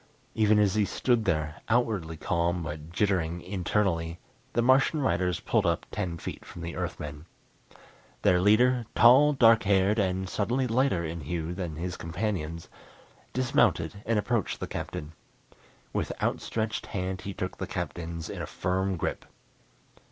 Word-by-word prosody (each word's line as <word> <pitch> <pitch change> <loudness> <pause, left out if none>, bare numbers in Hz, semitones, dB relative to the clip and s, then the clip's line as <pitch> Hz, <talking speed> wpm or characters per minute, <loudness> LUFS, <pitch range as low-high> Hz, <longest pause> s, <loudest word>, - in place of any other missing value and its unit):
Even 110 -1 +4
as 105 -3 +3
he 110 - +2
stood 115 +2 +1
there, 75 -5 -1
outwardly 110 -9 +1
calm 85 +2 0
but 75 0 -6
jittering 90 -3 0
internally, 90 -3 -1 0.4
the 120 - +2
Martian 135 +5 +4
riders 90 - 0
pulled - - +1
up - - 0
ten 85 -2 -3
feet - - -7
from 85 - -10
the 85 -2 -5
Earthmen. 75 +3 -5 1.0
Their 90 -1 +4
leader, 120 +4 +4
tall, 135 +6 +7
dark 115 -4 +6
haired, 100 +2 +3
and 95 -1 0
subtly 120 +7 0
lighter 120 -7 +1
in 80 +1 -5
hue 80 +3 -3
than 90 -4 -4
his 90 +3 -4
companions, 85 -2 -3 0.6
dismounted 100 -8 +1
and 115 -1 +2
approached 110 0 0
the - - -3
Captain. 75 +1 -5 0.8
With - - -1
outstretched 110 0 -2
hand 95 -1 -3
he 100 - -5
took - - -4
the - - -3
Captain's 85 -1 -4
in - - -6
a - - -4
firm 95 +1 -1
grip. - - -3
95 Hz, 145 wpm, -28 LUFS, 85-110 Hz, 1.0 s, tall